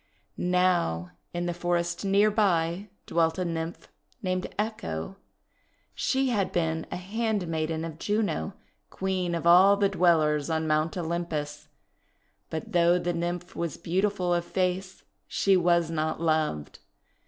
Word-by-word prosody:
Now, 180 - +1 0.2
in 175 0 -3
the 175 - -1
forest 175 0 -1
near 200 +2 +4
by 190 -2 +1 0.2
dwelt 165 -1 +1
a 185 - -1
Nymph 165 0 -4 0.4
named 185 -1 -1
Echo. 195 - -3 0.8
She 265 0 +1
had 205 -6 0
been 160 -2 -1
a - - -2
handmaiden 180 -6 -2
of 160 -1 -7
Juno, 205 - -1 0.3
Queen 185 -2 -1
of 170 - -4
all 185 +4 +7
the 200 -1 +3
Dwellers 160 -5 +3
on 160 0 0
Mount 155 +1 +1
Olym 170 0 -2
pus. 150 -1 -4 0.8
But 160 -1 -5
though 175 0 +4
the 175 0 -1
Nymph 175 +1 -3
was 170 -4 -3
beautiful 180 +1 0
of 175 0 +1
face, 185 +1 -2 0.2
she 195 -1 +3
was 170 -2 +3
not 155 -1 -1
loved. 155 - -1
175 Hz, 135 wpm, -27 LUFS, 160-190 Hz, 0.8 s, all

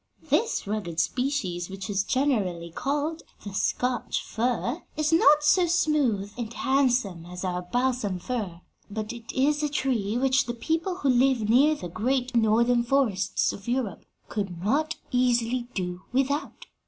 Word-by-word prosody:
This 450 - +1
rugged 200 -5 -3
species 195 -6 -1
which 195 0 -6
is 195 -1 0
generally 200 -11 0
called 295 - -2 0.2
the 200 - -6
Scotch 250 +4 -1
fir 245 +6 -1 0.2
is 305 +1 +1
not 300 -2 +6
so 350 +4 +4
smooth 295 - +1
and 230 -2 -4
handsome 245 -10 +1
as 180 +1 -7
our 180 -1 -1
balsam 245 -1 -1
fir, 185 -4 -4 0.3
but 215 +2 -4
it 230 -1 -8
is 290 +3 +2
a 300 - 0
tree 240 -7 0
which 265 +1 +2
the 240 - -3
people 330 +9 -1
who 285 -7 -1
live 250 -3 +3
near 280 +7 +5
the 235 - -6
great 245 +7 -1
Northern 235 +2 +4
forests 235 -6 +1
of 200 - -10
Europe 240 -6 -2 0.2
could 190 -5 -4
not 305 +9 +1 0.2
easily 245 -1 +1
do 180 -1 -3
without. 275 +4 -1
245 Hz, 150 wpm, -26 LUFS, 200-275 Hz, 0.3 s, not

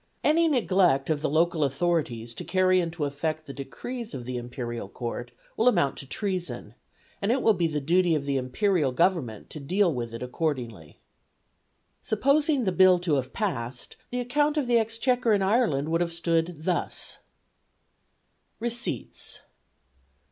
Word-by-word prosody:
Any 330 +2 +4
neglect 185 - +3
of 150 -2 0
the - - 0
local 160 +1 +2
authorities 135 -6 -1
to - - -6
carry 185 0 +3
into 165 -3 -2
effect 155 +2 -3
the 140 - -8
decrees 230 - -6
of 125 -2 -6
the 125 0 -4
Imperial 120 -3 -5
Court 120 +1 -5 0.3
will 225 - +2
amount 140 - +3
to 135 - -9
treason, 175 - -3 0.5
and 200 +3 +1
it 255 +1 +1
will 220 - +5
be 175 -3 +1
the 150 -2 -2
duty 170 +3 +3
of 145 -2 -2
the 140 -1 0
Imperial 145 +3 +1
Government 150 - 0
to 155 - -6
deal 180 +5 +2
with 120 -3 -4
it 115 +1 -6
accordingly. 125 - -3 1.0
Supposing 280 +4 +2
the 190 - +1
Bill 185 0 +6
to 175 -3 -1
have 130 -3 0
passed, 130 - -3
the 250 - -2
account 290 +5 +1
of 290 - +1
the 240 -1 +4
Exchequer 230 +1 +1
in 200 -2 +2
Ireland 190 - +2
would 165 +1 +1
have 170 -1 0
stood 165 -1 -1
thus: 175 0 -1 1.4
RECEIPTS. 235 +1 -3
170 Hz, 155 wpm, -27 LUFS, 135-210 Hz, 1.4 s, Bill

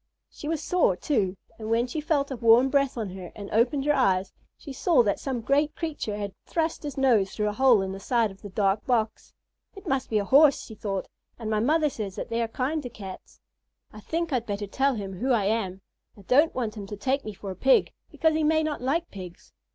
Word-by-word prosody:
She 295 - -8
was 320 -1 -2
sore, 355 - +2
too, 190 -3 -1 0.2
and 220 0 -5
when 230 +1 +2
she 280 +5 -4
felt 290 -2 0
a - - -2
warm 235 +2 +5
breath 275 -2 +1
on 215 -5 -3
her 185 -2 -8
and 200 -1 -8
opened 250 +5 +2
her 295 - +4
eyes, 190 -7 +1 0.2
she 280 - -9
saw 265 -1 +3
that 200 -3 0
some 260 -4 -3
great 290 +5 +1
creature 295 -11 -4
had 200 -2 -4
thrust 325 -1 -1
his 290 -3 -6
nose 235 -8 +3
through 210 -1 0
a - - -4
hole 245 -4 +4
in 190 - -4
the 195 - -6
side 230 0 +1
of 195 - -16
the 205 - -8
dark 195 +1 +1
box. 225 -4 -1 0.4
"It 390 - -12
must 270 -1 -1
be 220 - +1
a 205 - 0
Horse," 280 +4 +5
she 220 - -10
thought, 200 -3 -4 0.3
"and 220 -2 -4
my 215 - +2
mother 305 +7 +3
says 210 -8 -5
that - - -5
they 230 0 -1
are 230 - 0
kind 270 +7 -2
to 250 - -6
Cats. 195 -5 -10 0.5
I 215 - -10
think 330 +7 -3
I'd 240 -2 -1
better 205 0 -3
tell 270 +6 +1
him 195 -3 -6
who 260 +3 +1
I 215 -4 +2
am. 195 -3 -1 0.4
I 200 - -14
don't 290 - +3
want 230 -4 -2
him 200 -1 -6
to 205 - -7
take 270 +6 0
me 215 -2 -7
for 195 0 -7
a - - -7
Pig, 265 +8 +3 0.2
because 320 -1 +1
he 315 0 +1
may 315 +1 +3
not 305 -3 -3
like 320 +7 -1
Pigs." 180 -3 -10
235 Hz, 240 wpm, -26 LUFS, 205-280 Hz, 0.5 s, warm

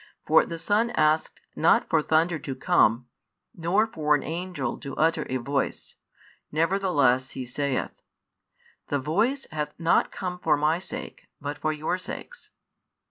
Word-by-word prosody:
For - - +5
the 165 - -5
Son 210 +7 +1
asked 155 +1 +2 0.2
not - - +3
for - - +3
thunder 160 +2 +2
to 135 -2 -5
come, 125 -6 +3 0.5
nor 180 +6 +2
for 150 -9 +1
an 140 - -2
angel 165 -6 -4
to 140 - -7
utter 160 +1 +1
a 130 - 0
voice, 135 +3 -2 0.6
nevertheless 155 -7 +2
He 130 - -3
saith: 135 +2 -2 0.9
The 145 - 0
Voice 210 - 0
hath 150 -1 -3
not 165 0 +2
come 180 -1 -5
for 155 -4 +2
My 155 +3 +2
sake, 185 - -8
but 145 0 -5
for 155 - 0
your 155 +4 -2
sakes. - - -9
155 Hz, 145 wpm, -26 LUFS, 140-180 Hz, 0.9 s, For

